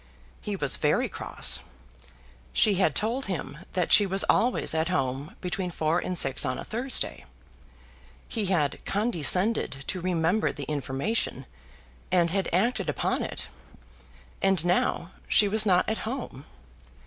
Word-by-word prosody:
He -, -, -3 dB
was -, -, +2 dB
very -, -, +1 dB
cross. -, -, +1 dB, 0.9 s
She 210 Hz, -, +5 dB
had 190 Hz, 0 st, +1 dB
told 235 Hz, +5 st, 0 dB
him 165 Hz, -5 st, -5 dB
that 180 Hz, -3 st, -1 dB
she 205 Hz, -, +7 dB
was 195 Hz, +1 st, +2 dB
always 245 Hz, -7 st, +2 dB
at 160 Hz, 0 st, 0 dB
home 140 Hz, -3 st, -2 dB
between 180 Hz, 0 st, -3 dB
four 160 Hz, 0 st, 0 dB
and 180 Hz, 0 st, -3 dB
six 135 Hz, -4 st, +2 dB
on 130 Hz, -1 st, -1 dB
a -, -, -6 dB
Thursday. 245 Hz, -, -2 dB, 1.0 s
He 215 Hz, -3 st, -2 dB
had 155 Hz, -7 st, 0 dB
condescended 190 Hz, -, +1 dB
to 185 Hz, -, -3 dB
remember 180 Hz, +3 st, +1 dB
the 145 Hz, -, -7 dB
information, 145 Hz, -, -2 dB, 0.7 s
and 175 Hz, -2 st, +3 dB
had 195 Hz, +1 st, -1 dB
acted 220 Hz, +9 st, +1 dB
upon -, -, -1 dB
it, -, -, -4 dB, 1.0 s
and 190 Hz, -4 st, +2 dB
now 175 Hz, 0 st, 0 dB, 0.2 s
she 205 Hz, -, +4 dB
was 215 Hz, +1 st, +2 dB
not 180 Hz, -2 st, +3 dB
at 220 Hz, -, -1 dB
home! 225 Hz, -, -6 dB
185 Hz, 140 wpm, -27 LUFS, 160-210 Hz, 1.0 s, she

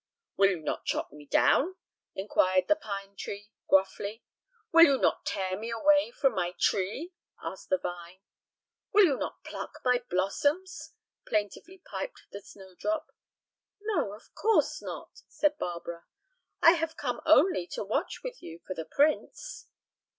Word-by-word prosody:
"Will 195 Hz, 0 st, +5 dB
you 185 Hz, -4 st, -1 dB
not 155 Hz, -, -3 dB
chop -, -, -1 dB
me 145 Hz, -1 st, -13 dB
down?" 350 Hz, -, +3 dB, 0.4 s
inquired 185 Hz, -2 st, +2 dB
the 310 Hz, -, +5 dB
pine 200 Hz, -4 st, -6 dB
tree, 205 Hz, +1 st, -7 dB, 0.2 s
gruffly. 200 Hz, +3 st, +1 dB, 0.5 s
"Will 335 Hz, 0 st, +9 dB
you 275 Hz, -4 st, +4 dB
not -, -, +1 dB
tear 185 Hz, -1 st, -1 dB
me 220 Hz, +4 st, -5 dB, 0.5 s
from 270 Hz, -2 st, +3 dB
my 180 Hz, 0 st, -2 dB
tree?" 215 Hz, -, 0 dB, 0.3 s
asked 190 Hz, -, -7 dB
the 185 Hz, -, +3 dB
vine. 175 Hz, +1 st, -7 dB, 0.7 s
"Will 415 Hz, -1 st, +8 dB
you 290 Hz, -6 st, +2 dB
not -, -, -5 dB
pluck -, -, -7 dB
my 250 Hz, -1 st, +3 dB
blossoms?" 290 Hz, -, -1 dB, 0.3 s
plaintively 215 Hz, -, -2 dB
piped -, -, -6 dB
the 200 Hz, -, -7 dB
snowdrop. 195 Hz, -, -5 dB, 0.7 s
"No, 405 Hz, -, -1 dB
of 215 Hz, -, -15 dB
course 445 Hz, 0 st, +2 dB
not," -, -, -8 dB
said 300 Hz, 0 st, 0 dB
Barbara; 170 Hz, -1 st, -5 dB, 0.6 s
"I 330 Hz, -, +10 dB
have 325 Hz, -2 st, -1 dB
come 245 Hz, -4 st, -3 dB
only 315 Hz, -, +5 dB
to -, -, -4 dB
watch 275 Hz, -, -2 dB
with -, -, -6 dB
you 165 Hz, 0 st, -9 dB
for 185 Hz, -, -4 dB
the 160 Hz, -3 st, -5 dB
prince." 310 Hz, -, 0 dB
210 Hz, 145 wpm, -29 LUFS, -, 0.7 s, I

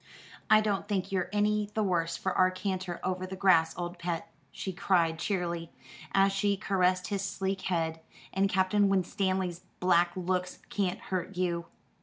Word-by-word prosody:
"I 215 Hz, 0 st, +7 dB
don't 205 Hz, -2 st, -1 dB
think 195 Hz, -1 st, -1 dB
you're 185 Hz, -2 st, 0 dB
any 210 Hz, 0 st, +1 dB
the 215 Hz, -, +2 dB
worse 170 Hz, -4 st, 0 dB
for 190 Hz, -, -1 dB
our 185 Hz, 0 st, +4 dB
canter 185 Hz, -1 st, -3 dB
over 185 Hz, 0 st, -2 dB
the 190 Hz, -, -6 dB
grass, 180 Hz, -4 st, +4 dB
old 175 Hz, 0 st, -4 dB
pet," 170 Hz, -1 st, -3 dB, 0.2 s
she 190 Hz, -, -5 dB
cried 170 Hz, -3 st, +2 dB
cheerily, 170 Hz, -3 st, -2 dB, 0.4 s
as 195 Hz, 0 st, +4 dB
she 200 Hz, +1 st, +1 dB
caressed 185 Hz, -1 st, +1 dB
his 200 Hz, -2 st, -1 dB
sleek 195 Hz, 0 st, -2 dB
head, 165 Hz, -3 st, -1 dB, 0.3 s
"and 195 Hz, +1 st, +2 dB
Captain 195 Hz, +1 st, +3 dB
Winstanley's 185 Hz, -1 st, 0 dB, 0.2 s
black 175 Hz, -1 st, +4 dB
looks 185 Hz, 0 st, -1 dB
can't 190 Hz, -2 st, 0 dB
hurt 185 Hz, 0 st, -4 dB
you." 170 Hz, -2 st, -1 dB
185 Hz, 160 wpm, -30 LUFS, 175-195 Hz, 0.4 s, I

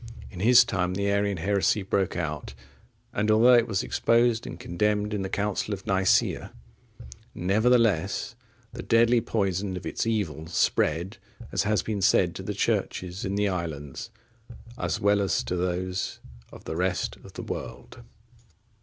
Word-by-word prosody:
In 90 Hz, -, -9 dB
his 120 Hz, +5 st, +7 dB
time 90 Hz, -4 st, -1 dB
the 100 Hz, +1 st, 0 dB
Arian 100 Hz, -1 st, 0 dB
heresy 100 Hz, +3 st, +1 dB
broke 95 Hz, -2 st, -1 dB
out, 75 Hz, -5 st, -4 dB, 0.6 s
and 105 Hz, +1 st, 0 dB
although 115 Hz, +4 st, +6 dB
it 120 Hz, -1 st, +5 dB
was 100 Hz, -4 st, -1 dB
exposed 115 Hz, 0 st, +2 dB
and -, -, -8 dB
condemned 105 Hz, +3 st, -1 dB
in 105 Hz, -, -1 dB
the 95 Hz, -, -3 dB
Council 105 Hz, +1 st, -1 dB
of 95 Hz, -, -14 dB
Nicaea,(60) 95 Hz, 0 st, +2 dB, 0.9 s
nevertheless, 105 Hz, 0 st, +2 dB, 0.4 s
the 120 Hz, -, -6 dB
deadly 115 Hz, +1 st, +3 dB
poison 95 Hz, -3 st, -1 dB
of 90 Hz, -, -8 dB
its -, -, -2 dB
evil 85 Hz, -9 st, -2 dB
spread, 85 Hz, +3 st, 0 dB, 0.3 s
as -, -, 0 dB
has 105 Hz, 0 st, +1 dB
been 105 Hz, -3 st, -3 dB
said, -, -, +3 dB
to -, -, -7 dB
the -, -, -4 dB
Churches 90 Hz, +1 st, -2 dB
in 95 Hz, +1 st, -2 dB
the 105 Hz, 0 st, +1 dB
islands, 80 Hz, -7 st, -5 dB, 0.7 s
as 85 Hz, -8 st, -2 dB
well 100 Hz, 0 st, +3 dB
as 95 Hz, -4 st, 0 dB
to 90 Hz, -, -3 dB
those 90 Hz, +1 st, -2 dB, 0.3 s
of -, -, -13 dB
the -, -, -5 dB
rest 90 Hz, +1 st, -1 dB
of -, -, -15 dB
the -, -, -7 dB
world. -, -, -7 dB
100 Hz, 155 wpm, -26 LUFS, 90-105 Hz, 0.9 s, his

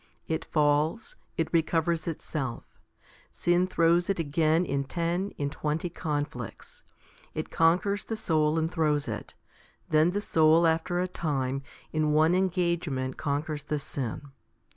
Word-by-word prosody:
It 160 Hz, -, -2 dB
falls; 150 Hz, +7 st, +1 dB, 0.2 s
it 165 Hz, -, -1 dB
recovers 165 Hz, 0 st, +1 dB
itself. 145 Hz, -6 st, -5 dB, 0.5 s
Sin 175 Hz, +1 st, +1 dB
throws 170 Hz, 0 st, +3 dB
it 195 Hz, -, +1 dB
again 160 Hz, +2 st, +2 dB
in 140 Hz, -3 st, -1 dB
ten, 170 Hz, +6 st, -1 dB
in 140 Hz, -1 st, -2 dB
twenty 155 Hz, +4 st, -2 dB
conflicts. 145 Hz, -, -5 dB, 0.5 s
It 155 Hz, -, -4 dB
conquers 185 Hz, +5 st, +2 dB
the 225 Hz, -, -3 dB
soul 155 Hz, -6 st, +1 dB
and 160 Hz, 0 st, +1 dB
throws 155 Hz, -4 st, 0 dB
it; -, -, -5 dB, 0.5 s
then 155 Hz, +1 st, +4 dB
the 195 Hz, +3 st, -1 dB
soul 160 Hz, -2 st, +4 dB
after 165 Hz, +2 st, +1 dB
a 180 Hz, -, +1 dB
time 135 Hz, -6 st, -2 dB, 0.3 s
in 155 Hz, -1 st, +1 dB
one 155 Hz, +3 st, +4 dB
engagement 170 Hz, -8 st, 0 dB
conquers 150 Hz, 0 st, -2 dB
the 150 Hz, -, -2 dB
sin. 140 Hz, 0 st, -5 dB
160 Hz, 135 wpm, -28 LUFS, 150-170 Hz, 0.5 s, then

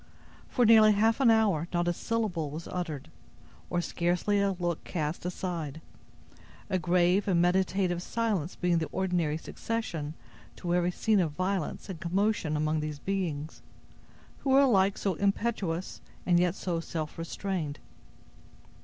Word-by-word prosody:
For 245 Hz, -, +3 dB
near 220 Hz, -1 st, +8 dB
half 220 Hz, +3 st, +3 dB
an 265 Hz, -4 st, +5 dB
hour, 205 Hz, -8 st, +3 dB
not 175 Hz, 0 st, 0 dB
a 175 Hz, -, +2 dB
syllable 190 Hz, -7 st, -2 dB
was 155 Hz, +4 st, -7 dB
uttered, 155 Hz, -, -5 dB, 0.6 s
or 175 Hz, -, 0 dB
scarcely 175 Hz, +4 st, 0 dB
a 200 Hz, -1 st, +2 dB
look 175 Hz, -2 st, -2 dB
cast 160 Hz, 0 st, -3 dB
aside; 170 Hz, -5 st, -4 dB, 0.9 s
a 185 Hz, -, +2 dB
grave 180 Hz, +4 st, +2 dB
and 180 Hz, -3 st, +3 dB
meditative 180 Hz, 0 st, +2 dB
silence 200 Hz, -6 st, -1 dB
being 175 Hz, -2 st, +1 dB
the 160 Hz, -, -2 dB
ordinary 175 Hz, -5 st, 0 dB
succession 165 Hz, -6 st, -4 dB, 0.4 s
to 175 Hz, -1 st, -2 dB
every 175 Hz, 0 st, +2 dB
scene 210 Hz, +3 st, +2 dB
of 165 Hz, -5 st, 0 dB
violence 185 Hz, 0 st, -2 dB
and 185 Hz, -5 st, -6 dB
commotion 185 Hz, -3 st, 0 dB
among 155 Hz, +1 st, +1 dB
these 150 Hz, -1 st, -4 dB
beings, 165 Hz, -4 st, -3 dB, 0.8 s
who 275 Hz, -, -3 dB
were 270 Hz, +1 st, +6 dB
alike 200 Hz, -7 st, +4 dB
so 195 Hz, -, 0 dB
impetuous 195 Hz, -2 st, -1 dB, 0.2 s
and 175 Hz, -1 st, +4 dB
yet 180 Hz, 0 st, +2 dB
so 175 Hz, -4 st, -2 dB
self 160 Hz, -1 st, -5 dB
restrained. 165 Hz, -3 st, -3 dB
180 Hz, 145 wpm, -29 LUFS, 165-200 Hz, 0.9 s, near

